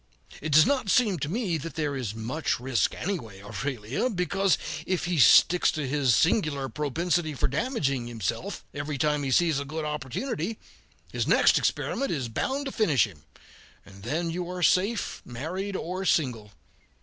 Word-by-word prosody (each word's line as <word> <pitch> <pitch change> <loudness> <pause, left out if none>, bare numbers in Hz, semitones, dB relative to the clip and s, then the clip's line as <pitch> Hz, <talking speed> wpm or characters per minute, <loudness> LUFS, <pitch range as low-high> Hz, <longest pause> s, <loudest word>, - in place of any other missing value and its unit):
It 155 - -3
does 155 +2 +7
not 260 -5 0
seem 205 -6 +3
to 145 - -3
me 190 -5 -1
that 165 +4 -7
there 150 -3 -1
is 115 -6 -4
much 120 +8 -2
risk, 125 -1 0
anyway, 115 - -4
Aurelia, 125 - -3
because 195 -1 +1 0.3
if 185 -2 0
he 175 -3 0
sticks 175 +6 +6
to 150 -3 -3
his 135 -3 +2
singular 155 -6 +2
propensity 155 +4 -1
for - - +1
damaging 140 - -1
himself 120 - -4
every 145 0 -4
time 150 +2 +1
he 140 - -2
sees 160 +1 +3
a - - -3
good 155 +2 -5
opportunity, 155 - -3 0.5
his - - -2
next - - +5
experiment 275 - -1
is 130 -7 -2
bound 270 - -2
to 270 - -3
finish 160 - +3
him, 85 -9 -14 0.6
and 100 0 -14
then 160 - -2
you 175 +1 -4
are 180 -1 -4
safe, 200 +7 +1
married 180 +11 -5
or 185 +2 -3
single. 125 - 0
155 Hz, 165 wpm, -27 LUFS, 130-180 Hz, 0.6 s, does